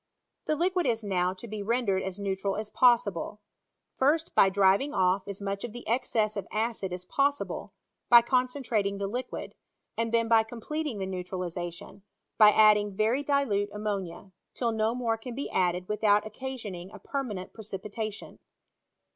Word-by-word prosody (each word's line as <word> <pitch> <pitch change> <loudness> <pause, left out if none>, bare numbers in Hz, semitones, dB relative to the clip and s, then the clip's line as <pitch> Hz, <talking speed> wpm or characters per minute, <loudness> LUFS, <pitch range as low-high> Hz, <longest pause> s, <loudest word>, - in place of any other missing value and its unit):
The 305 - +1
liquid 355 0 +1
is 225 -2 0
now 180 -3 +1
to 215 +5 -10
be 215 -1 -5
rendered 205 -3 +1
as 190 0 -4
neutral 195 -1 -2
as 215 0 -5
possible; 210 -5 +2 0.6
first, 310 +5 +2
by 195 - +6
driving 200 +9 +3
off 185 +1 +2
as 200 -1 -6
much 200 0 -3
of 240 - -5
the 240 - -9
excess 225 -3 0
of 200 -2 -4
acid 215 -3 -1
as 180 0 -5
possible, 280 +7 -1 0.4
by 235 -1 +9
concentrating 250 -5 0
the 200 - -2
liquid; 245 +5 -5 0.4
and 230 0 -1
then 230 0 +2
by 225 -1 +6
completing 240 +4 -4
the 195 - -3
neutralization, 180 0 -5 0.4
by 215 -1 +9
adding 210 -2 +5
very 225 +7 +2
dilute 275 -9 +1
ammonia, 200 -3 -4 0.2
till 235 -2 0
no 220 +1 0
more 230 -2 0
can 240 +1 -7
be 280 - -4
added 180 0 0
without 210 0 +2
occa 260 +5 -5
sioning 190 -7 -7
a - - -10
permanent 225 -10 -5
precipitation. 210 0 -6
215 Hz, 160 wpm, -28 LUFS, 195-240 Hz, 0.6 s, by